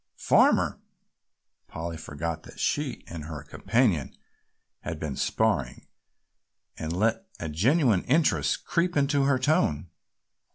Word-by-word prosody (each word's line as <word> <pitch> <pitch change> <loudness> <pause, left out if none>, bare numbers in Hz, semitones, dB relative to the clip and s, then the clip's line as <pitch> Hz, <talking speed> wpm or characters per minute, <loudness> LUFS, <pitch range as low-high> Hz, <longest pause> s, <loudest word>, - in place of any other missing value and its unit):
"Farmer?" - - +3 0.9
Polly 80 +1 -5
forgot 80 +1 -5
that - - -14
she - - -1
and 80 -3 -8
her 75 -3 -7
companion 100 - 0 0.6
had 80 - -6
been 75 -4 -4
sparring - - 0 0.9
and 80 0 -4
let 110 - 0
a 80 - -4
genuine 110 - +3
interest 105 - +2
creep 175 -1 0
into 140 0 +2
her 140 -1 +3
tone. 90 - +1
90 Hz, 115 wpm, -27 LUFS, -, 0.9 s, Farmer